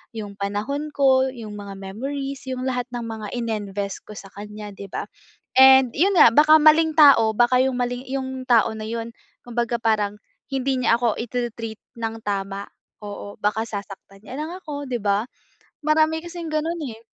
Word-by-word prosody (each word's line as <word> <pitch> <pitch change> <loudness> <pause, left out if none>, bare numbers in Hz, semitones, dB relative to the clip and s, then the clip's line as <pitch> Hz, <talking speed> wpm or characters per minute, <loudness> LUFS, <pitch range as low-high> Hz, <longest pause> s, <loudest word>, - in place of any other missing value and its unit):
yung 205 -2 -6
panahon 215 +10 -3
ko, 265 -2 +4
yung 220 -4 -8
mga 200 -1 -8
memories, 270 +7 -5
yung 255 0 -3
lahat 250 -1 -1
ng 240 -1 -4
mga 220 -2 -6
ininvest 205 -4 -3
ko - - -10
sa 195 - -9
kanya 210 +1 -8
'di 195 -1 -10
ba? - - -4 0.5
And 265 -1 +8
'yon 380 +7 +3
nga 265 - +9
baka 310 +1 +7
maling 315 +1 +5
tao 270 -7 +7
baka 245 +2 +4
yung 260 -1 0
mali 245 +1 -2
yung 265 -1 -3
tao 230 -2 +4
na 215 - -6
'yon, 230 0 -5 0.3
kumbaga 240 0 -1
parang 210 -2 +1 0.3
hindi 265 -1 0
niya 230 0 +3
ako 235 -3 +1
itre-treat 230 -2 -4 0.2
ng 225 0 -3
tama, 195 0 -3 0.4
oo 205 0 -8
baka 210 +1 0
sasaktan 195 -2 -8
niya 255 - -8
lang 315 +2 -5
ako 290 -3 -6
'di 245 -2 -1
ba, 200 +1 +1 0.6
marami 315 +1 +3
kasing 345 -2 -6
gano'n, 325 +2 -1
eh. 220 - -13
240 Hz, 170 wpm, -23 LUFS, 210-270 Hz, 0.6 s, nga